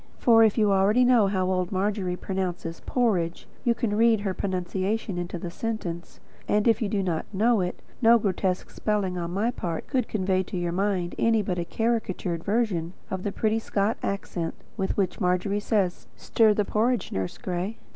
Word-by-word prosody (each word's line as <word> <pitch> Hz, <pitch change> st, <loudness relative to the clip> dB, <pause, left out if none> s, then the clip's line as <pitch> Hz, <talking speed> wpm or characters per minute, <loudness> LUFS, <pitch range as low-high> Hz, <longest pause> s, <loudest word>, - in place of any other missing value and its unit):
For 225 Hz, -2 st, +6 dB
if 220 Hz, 0 st, +3 dB
you 215 Hz, -, +4 dB
know -, -, +4 dB
already 200 Hz, +6 st, +4 dB
how 205 Hz, -7 st, +3 dB
old 185 Hz, -1 st, 0 dB
Margery 190 Hz, -1 st, -1 dB
pronounces 180 Hz, -3 st, -3 dB
"porridge," 190 Hz, -9 st, 0 dB, 0.2 s
you 240 Hz, -2 st, +2 dB
can 225 Hz, -3 st, -1 dB
read 225 Hz, -1 st, +4 dB
her 195 Hz, -2 st, -1 dB
pronunciation 190 Hz, +1 st, -2 dB
into 175 Hz, 0 st, -4 dB
the 170 Hz, 0 st, -6 dB
sentence; 180 Hz, -5 st, -5 dB, 0.3 s
and 210 Hz, +1 st, +2 dB
if 225 Hz, -1 st, +3 dB
you 215 Hz, -, 0 dB
do 200 Hz, -1 st, 0 dB
not 170 Hz, -4 st, -2 dB
know 220 Hz, +2 st, +3 dB
it, 180 Hz, 0 st, -4 dB, 0.2 s
no 235 Hz, 0 st, +7 dB
grotesque 190 Hz, -3 st, -1 dB
spelling 195 Hz, -4 st, -1 dB
on 170 Hz, -1 st, -3 dB
my 205 Hz, +7 st, 0 dB
part 170 Hz, -8 st, -4 dB
could 255 Hz, -5 st, -1 dB
convey 190 Hz, -2 st, +1 dB
to 185 Hz, -, -5 dB
your 175 Hz, -1 st, -1 dB
mind 185 Hz, -1 st, 0 dB
any 225 Hz, -2 st, +3 dB
but 180 Hz, -2 st, -2 dB
a 170 Hz, -, -2 dB
caricatured 185 Hz, -5 st, -1 dB
version 200 Hz, -6 st, 0 dB, 0.2 s
of 190 Hz, -1 st, -2 dB
the 205 Hz, -, -2 dB
pretty 220 Hz, +2 st, 0 dB
Scotch 210 Hz, 0 st, -1 dB
accent 175 Hz, -4 st, -3 dB, 0.2 s
with 195 Hz, -3 st, -2 dB
which 185 Hz, -3 st, -1 dB
Margery 180 Hz, +3 st, +1 dB
says: 205 Hz, -4 st, 0 dB
"Stir 220 Hz, -2 st, +3 dB
the 210 Hz, -, +1 dB
porridge, 225 Hz, 0 st, 0 dB
Nurse 95 Hz, -1 st, -3 dB
Gray." 185 Hz, +5 st, -3 dB
195 Hz, 185 wpm, -26 LUFS, 180-220 Hz, 0.3 s, no